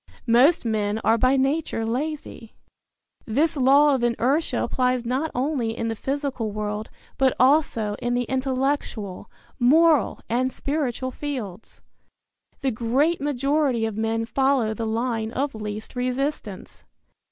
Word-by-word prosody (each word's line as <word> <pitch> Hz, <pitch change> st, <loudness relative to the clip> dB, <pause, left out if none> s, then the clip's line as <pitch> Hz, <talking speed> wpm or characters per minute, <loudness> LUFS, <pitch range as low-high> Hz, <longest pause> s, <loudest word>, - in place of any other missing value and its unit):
Most 255 Hz, +6 st, +4 dB
men 215 Hz, -2 st, 0 dB
are 225 Hz, +1 st, +3 dB
by 255 Hz, +3 st, +3 dB
nature 270 Hz, -3 st, 0 dB
lazy. 255 Hz, -1 st, -4 dB, 0.7 s
This 290 Hz, +9 st, +1 dB
law 280 Hz, +2 st, +5 dB
of 265 Hz, -, 0 dB
inertia 245 Hz, +6 st, +1 dB
applies 250 Hz, -1 st, 0 dB
not 260 Hz, +7 st, -1 dB
only 250 Hz, -4 st, -1 dB
in 230 Hz, -, -2 dB
the 225 Hz, -, -2 dB
physical 270 Hz, -3 st, -3 dB
world, 210 Hz, +1 st, -4 dB, 0.3 s
but 265 Hz, -1 st, +3 dB
also 255 Hz, -6 st, +3 dB
in 240 Hz, 0 st, 0 dB
the 245 Hz, -, +1 dB
intellectual, 260 Hz, -6 st, -2 dB, 0.3 s
moral 305 Hz, +3 st, +4 dB
and 255 Hz, +3 st, 0 dB
spiritual 260 Hz, -3 st, -2 dB
fields. 245 Hz, -9 st, -7 dB, 0.8 s
The 270 Hz, -2 st, +1 dB
great 260 Hz, +8 st, +1 dB
majority 275 Hz, -3 st, +1 dB
of 220 Hz, -2 st, -3 dB
men 225 Hz, +1 st, -1 dB
follow 265 Hz, -2 st, +1 dB
the 225 Hz, +1 st, -4 dB
line 225 Hz, 0 st, -1 dB
of 280 Hz, +1 st, -1 dB
least 215 Hz, +1 st, -6 dB
resistance. 250 Hz, -5 st, -3 dB
250 Hz, 130 wpm, -24 LUFS, 225-280 Hz, 0.8 s, law